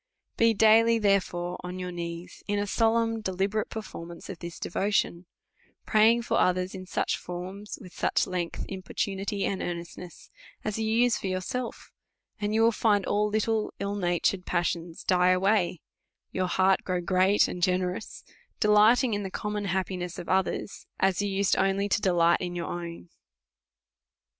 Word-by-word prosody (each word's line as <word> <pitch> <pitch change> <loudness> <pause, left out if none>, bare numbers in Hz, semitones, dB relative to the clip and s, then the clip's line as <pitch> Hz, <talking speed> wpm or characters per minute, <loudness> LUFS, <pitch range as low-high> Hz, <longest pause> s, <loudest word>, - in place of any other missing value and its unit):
Be 230 -1 +3
daily, 225 +2 +5
therefore, 185 -4 0
on 180 0 -5
3rour 180 -1 -5
knees 170 0 -6
in 205 - 0
a 205 - 0
solemn 225 +1 +1
deli 190 -1 0
berate 215 +2 -2
performance 170 -6 -8
of 185 -4 -7
this 170 -1 -7
devotion, 185 -2 -1 0.6
praying 225 +2 +4
for - - +1
others 180 0 +1
in 185 -1 -8
forms, 185 +3 -4
with 180 - -12
such - - +1
length 180 -2 -3
and - - -7
importunity, 195 +1 -3
and 195 - -2
earn 175 -1 -2
estness, 170 0 -11 0.3
as 215 +1 -2
you 220 - -1
use 235 +2 +3
for - - -4
yourself; 190 +7 -4 0.5
and 210 +1 -1
you 225 - +4
will 230 - +5
find 210 -3 +2
all 210 +1 +1
little 215 +1 0
ill 200 0 -2
natured 180 -1 0
passions 170 -1 -2
die 180 0 +3
away, 185 -2 +2 0.5
your 185 -1 -1
heait 190 +1 +3
grow 180 -1 -1
great 185 +3 +3
and 180 - -6
generous, 180 +2 -1 0.4
delighting 220 +3 +5
in 205 - -1
the 195 - -4
common 210 +1 -3
happi 185 0 -1
ness 175 -1 -5
of - - -7
others, 190 +1 -1
a? 190 0 +3
you 205 - 0
used 195 0 +1
only 195 +1 +1
to 205 - +1
delight 170 -2 +3
in 175 -1 -4
your 170 -1 -3
own. 170 - -7
190 Hz, 165 wpm, -27 LUFS, 180-210 Hz, 0.6 s, daily